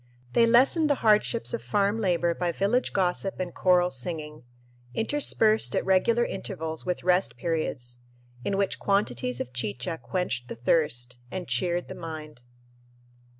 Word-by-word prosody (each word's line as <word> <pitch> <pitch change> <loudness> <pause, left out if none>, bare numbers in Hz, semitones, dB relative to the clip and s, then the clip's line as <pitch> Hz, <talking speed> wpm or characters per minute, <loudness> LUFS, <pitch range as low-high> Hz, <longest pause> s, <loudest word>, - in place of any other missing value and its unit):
They 230 - +5
lessened 270 +7 +4
the 285 - +4
hardships 215 +2 +3
of 235 - -2
farm 205 +1 0
labor 175 -3 +1
by 175 0 -1
village 200 +9 0
gossip 190 0 -1
and 180 -2 -3
choral 180 -1 +3
singing, 150 +3 -5 0.5
interspersed 225 -3 +3
at - - 0
regular 230 +5 +3
intervals 160 -3 -5
with 180 - -2
rest 180 +1 +2
periods, 145 -8 -3 0.4
in 195 - -1
which 200 -1 0
quantities 125 - 0
of 125 - -5
chicha 125 +6 -3
quenched 180 -10 -3
the - - -6
thirst 120 -1 0
and 185 -2 -5
cheered 175 +8 0
the - - -7
mind. 155 -5 -8
180 Hz, 145 wpm, -27 LUFS, 150-200 Hz, 0.5 s, They